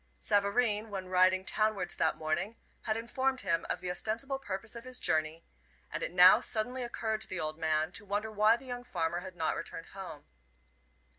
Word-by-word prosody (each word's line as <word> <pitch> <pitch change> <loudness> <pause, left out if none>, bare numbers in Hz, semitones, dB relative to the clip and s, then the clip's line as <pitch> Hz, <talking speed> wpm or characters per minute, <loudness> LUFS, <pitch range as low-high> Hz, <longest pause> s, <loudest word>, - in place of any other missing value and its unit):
Savareen, 210 +1 +2
when 190 -2 -5
riding 185 +1 +4
townwards 215 -1 +1
that - - +1
morning, 170 +8 -2 0.3
had 220 -1 0
informed 260 +3 -1
him 170 -4 0
of - - -1
the 180 -1 -2
ostensible 230 +9 -1
purpose 205 -2 -5
of 235 - -7
his 255 0 -5
journey, 155 +1 0 0.5
and - - -3
it - - -2
now - - +8
suddenly 245 +3 -2
occurred 220 -2 -2
to - - 0
the 185 - -4
old 155 0 -3
man 155 -1 +1
to - - -3
wonder 205 +2 -2
why 215 +2 +4
the 265 - -14
young 245 -1 -5
farmer 170 -6 -2
had 185 0 -9
not 160 -2 0
returned 165 - -6
home. 185 -7 -8
205 Hz, 190 wpm, -32 LUFS, 175-230 Hz, 0.5 s, now